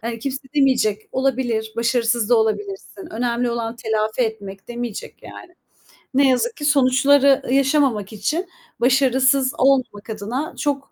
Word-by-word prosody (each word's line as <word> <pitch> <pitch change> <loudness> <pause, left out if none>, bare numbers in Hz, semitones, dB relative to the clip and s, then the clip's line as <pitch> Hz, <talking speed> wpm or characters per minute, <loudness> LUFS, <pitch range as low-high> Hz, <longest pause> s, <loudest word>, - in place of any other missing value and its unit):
Hani 230 0 -5
kimse 265 +2 -4 0.2
demeyecek. 245 -7 +1
"Olabilir, 245 -4 -1
başarısız 235 -1 +1
da 245 - +5
olabilirsin. 205 -3 -3
Önemli 240 +1 -1
olan 235 0 -4
telafi 220 +1 -2
etmek." 200 -3 -5
demeyecek 240 -3 -6
yani. 355 - -12 0.6
Ne 275 0 +4
yazık 450 - 0
ki 290 - -4
sonuçları 275 0 +4
yaşamamak 270 -7 +1
için 305 - -2 0.3
başarısız 265 +1 +3
olmamak 255 -6 +1
adına 220 +8 -4
çok 280 -2 -2
245 Hz, 125 wpm, -21 LUFS, 220-270 Hz, 0.6 s, da